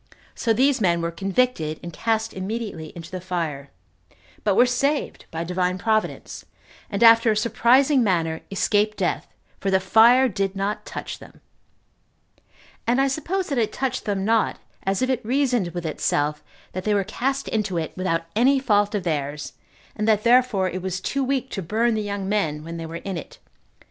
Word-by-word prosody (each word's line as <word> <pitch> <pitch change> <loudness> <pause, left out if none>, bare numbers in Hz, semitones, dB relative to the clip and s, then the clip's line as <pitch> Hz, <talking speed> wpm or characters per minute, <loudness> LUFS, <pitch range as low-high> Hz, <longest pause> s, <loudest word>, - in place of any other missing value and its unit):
So 230 - -1
these 260 +3 +3
men 170 -3 +3
were 170 0 -2
convicted, 190 -3 0
and 170 -1 -7
cast 225 -1 -1
immediately 190 -5 -5
into 165 -1 -9
the 185 -1 -5
fire, 165 -6 -3 0.7
but 200 -2 +2
were 245 - +6
saved 275 +4 -1
by 165 0 -4
Divine 180 +1 -1
Providence, 215 +2 -1 0.5
and 205 +1 0
after 230 0 +7
a 215 - +2
surprising 255 +4 +3
manner 165 -5 0
escaped 210 +2 +1
death, - - -1 0.3
for 195 - -1
the 190 0 +3
fire 225 +7 +6
did 195 -4 -2
not 200 +2 -3
touch - - -6
them; - - -15 1.5
and 245 +3 +3
I 275 - +4
suppose 335 +7 -2
that 275 -4 0
it 220 - +1
touched 265 -1 -2
them 195 -2 -1
not, 225 0 +2 0.2
as 195 +5 0
if 255 - 0
it 255 - -1
reasoned 250 -4 +1
with 175 0 -6
itself, 150 -1 -1 0.3
that 185 - -5
they 210 +1 +1
were 200 - +2
cast 265 +7 -2
into 210 -5 -1
it 160 -1 -3
without 185 -3 -1
any 260 +5 +4
fault 205 -5 +2
of 200 - -1
theirs, 150 -3 -3 0.4
and 210 +1 -2
that 215 -1 +3
therefore 240 -5 +4
it 185 0 -4
was 190 0 -3
too 275 +8 -1
weak 265 0 -1
to 195 - -3
burn 225 +7 +1
the 215 - -1
young 200 -2 -4
men 160 -8 -1
when 165 +1 -7
they 165 0 -5
were 165 - -8
in 195 -3 -3
it. 160 - -9
205 Hz, 185 wpm, -23 LUFS, 180-235 Hz, 1.5 s, after